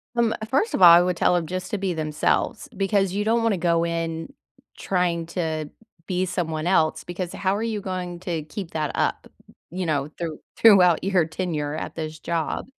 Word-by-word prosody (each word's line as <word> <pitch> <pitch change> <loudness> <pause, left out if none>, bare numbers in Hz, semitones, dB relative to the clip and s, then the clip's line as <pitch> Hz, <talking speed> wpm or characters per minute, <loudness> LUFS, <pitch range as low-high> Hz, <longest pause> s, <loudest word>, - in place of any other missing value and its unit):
Um, 235 -2 +2 0.2
first 350 - +1
of - - -1
all, 175 - +11
I 170 +1 +8
would 180 0 0
tell 180 - +3
'em 170 - 0
just 185 +4 -5
to 210 - 0
be 190 -2 -1
themselves, 155 +6 -1
because 195 -1 +1
you 205 +1 0
don't 230 +1 +2
wanna 220 -4 +2
go 170 -1 +1
in 165 +6 -3 0.4
trying 175 -3 0
to 160 -3 -3 0.4
be 185 0 0
someone 160 -4 -3
else, 160 -4 +2
because 175 0 -5
how 190 +1 0
are 215 - -2
you 220 -3 -2
going 180 -2 -5
to 170 -4 -3
keep 165 +3 -7
that 155 -2 -2
up, - - -1 0.4
you 180 +1 -4
know, 145 -2 -1
through 165 -3 -4 0.2
throughout 185 -7 +6
your 185 -3 +2
tenure 155 -3 -3
at - - -6
this 155 -1 -5
job? 165 0 -2
175 Hz, 190 wpm, -24 LUFS, 160-190 Hz, 0.4 s, all